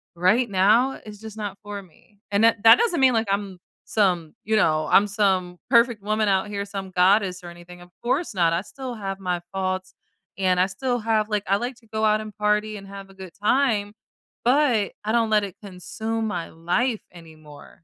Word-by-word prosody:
right 215 +8 +2
now, 210 +7 +4
it's 210 -1 -10
just 220 -1 -10
not 205 -2 -5
for 205 -1 -6
me. 195 +3 -23
And 200 +2 +2
that 225 -2 +4
that 225 - +9
doesn't 450 -8 +1
mean, 260 -1 +5
like, 225 -1 0
I'm 200 -2 -2 0.3
some, 180 -7 0
you 220 +1 0
know 155 -7 +2
I'm 205 - +6
some 190 -4 0
perfect 235 -3 +4
woman 215 +1 0
out 190 0 +1
here, 200 -1 -4
some 195 -1 -7
goddess 185 0 +2
or 175 - -8
anything, 175 +1 -13
of 175 - -14
course 270 +4 -1
not, 170 -2 +2
I 170 - 0
still 260 +4 -8
have 195 -3 -5
my 180 -2 -2
faults, 185 -1 -3 0.4
and 185 -2 +2
I 185 - +4
still 245 +6 -2
have 220 -1 0
like, 210 -2 -1
I 195 - +3
like 245 +4 -4
to 225 - -24
go 220 0 -1
out 215 0 +3
and 215 -2 -9
party 210 0 0
and 195 -1 -11
have 195 0 -10
a - - -16
good 190 -2 -10
time, 215 -4 +2 0.5
but, 250 -5 +2
I 215 - 0
don't 230 -1 +2
let 210 -1 +4
it 195 -3 -6
consume 220 +4 -4
my 175 -5 -4
life 205 +9 -1
anymore 155 -1 -15
205 Hz, 205 wpm, -24 LUFS, 185-220 Hz, 0.5 s, that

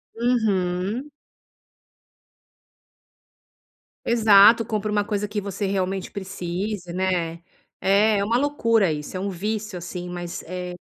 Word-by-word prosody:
Uhum. 220 0 0 3.0
Exato, 220 -1 +6
compra 215 -2 -2
uma 205 0 +2
coisa 205 0 -2
que 210 0 -3
você 200 +1 -4
realmente 190 -1 -2
precise, 185 -1 -4
né. 175 -3 -1 0.4
É, 200 +1 +3
uma 230 +4 +1
loucura 230 - +2
isso, 150 +4 -6
é - - -4
um 200 +2 -2
vício 210 +2 -3
assim, 175 +1 -6
mas 175 -1 -6
é 180 +1 -6
200 Hz, 110 wpm, -23 LUFS, 180-215 Hz, 3.0 s, Exato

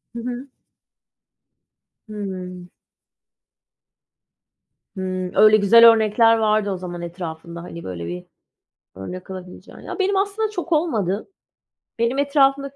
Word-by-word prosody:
Hı - - -4
hı. 250 +2 -6 1.6
Hıı. 185 -4 -7 2.3
Hıı, 185 -1 -3
öyle 215 0 +7
güzel 230 +3 +8
örnekler 225 +1 +3
vardı 215 -2 +1
o 190 - -3
zaman 175 -1 -7
etrafında. 170 -1 -7
Hani, 170 -1 -9
böyle 85 -2 -6
bir 90 +1 -6 0.7
örnek 180 - -8
alabileceğin. 185 -1 -10
Ya, - - -8
benim 390 +1 +1
aslında 405 +3 0
çok 360 -4 -6
olmadı. 220 - 0 0.7
Benim 235 +3 +1
etrafımdaki 275 -1 +2
210 Hz, 110 wpm, -21 LUFS, 180-270 Hz, 2.3 s, güzel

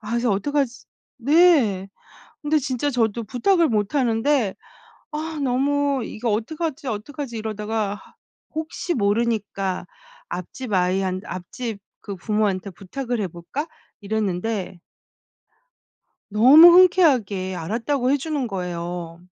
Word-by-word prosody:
아 215 -1 -8
그래서 235 0 +1
'어떡하지' 260 +5 -1 0.3
네. 265 - +4 0.5
근데 305 +1 +2
진짜 275 0 -1
저도 230 -2 0
부탁을 330 - +2
못하는데 230 +1 +1 0.6
아 310 0 -4
너무 275 0 +1
'이거 225 +1 -3
어떡하지, 300 +7 -3
어떡하지?' 235 +3 -5
이러다가 215 -1 -2
'아 - - -21 0.4
혹시 320 +3 -3
모르니까 205 -4 -1 0.4
앞집 205 +7 -6
아이 185 0 +2
한 185 -1 -2
앞집 200 +5 -6 0.2
그 200 -2 -7
부모한테 200 0 -1
부탁을 235 +6 -4
해 195 - -1
볼까?' 175 - -5 0.3
이랬는데 205 -2 -2 1.6
너무 280 +11 +9
흔쾌하게 245 - +3
알았다고 245 - -1
해 280 - +4
주는 285 -3 -2
거예요. 175 -3 -5
230 Hz, 260 characters per minute, -23 LUFS, 195-280 Hz, 1.6 s, 너무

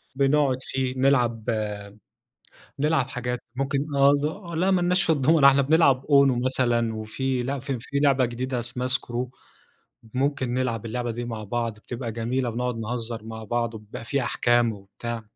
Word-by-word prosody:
بنقعد 140 -1 +3
فيه. 130 -1 -2
نلعب 125 -4 +2 1.4
نلعب 150 -2 +1
حاجات 125 -1 -3 0.2
ممكن 135 +1 0
آه، 140 +1 +6 0.4
ل 165 - -1
لأ 190 +1 +3
ما 185 - +3
لناش 180 +2 +2
في 165 - +3
الدومنة، 145 0 +5
إحنا 140 0 +5
بنلعب 140 -2 +4
أونو 140 -4 +5
مثلًا، 120 -3 +1
وفي 125 +4 -2
ل 135 +1 -3
في 135 -1 -3
في 140 +4 -3
لعبة 140 -3 +4
جديدة 125 +2 -3
اسمها 125 +1 -4
Skrew، 125 -1 -1 0.9
ممكن 135 -2 0
نلعب 120 -3 -1
اللعبة 120 +1 -3
دي 120 +1 -4
مع 110 -3 -5
بعض 115 +1 -2
بتبقى 120 +1 -6
جميلة، 120 +2 -1
بنقعُد 125 +1 -2
نهزّر 115 0 -4
مع 110 0 -7
بعض، 115 +1 -1
وبيبقى 105 +1 -9
في 140 +3 0
أحكام 120 -1 +2
وبتاع، 110 +3 -7
125 Hz, 160 wpm, -25 LUFS, 115-135 Hz, 1.4 s, آه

